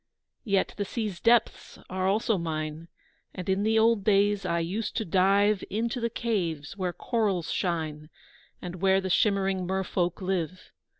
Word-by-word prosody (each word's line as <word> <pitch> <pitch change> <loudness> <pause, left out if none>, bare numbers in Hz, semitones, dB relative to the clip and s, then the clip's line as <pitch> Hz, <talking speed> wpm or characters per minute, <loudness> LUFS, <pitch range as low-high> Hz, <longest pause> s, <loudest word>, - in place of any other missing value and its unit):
Yet 200 -3 +1
the 205 - 0
sea's 210 -3 -4
depths 235 -1 +2
are 185 0 -1
also 210 0 +1
mine, 155 0 -4 0.5
And 180 -1 -6
in 190 +1 +1
the 220 +1 +2
old 225 -2 +4
days 200 -1 +2
I 170 - 0
used 185 +7 -2
to 220 - -1
dive 195 +3 +3
Into 235 +4 -2
the 235 - 0
caves, 185 -11 -2
where 185 -2 -2
corals 195 -6 -1
shine 155 -4 -2 0.5
And 180 0 -6
where 190 0 +4
the 190 -1 -3
shimmering 195 -2 +2
mer 190 +1 0
folk 180 -1 -1
live. 185 -2 -3
190 Hz, 160 wpm, -27 LUFS, 175-210 Hz, 0.5 s, old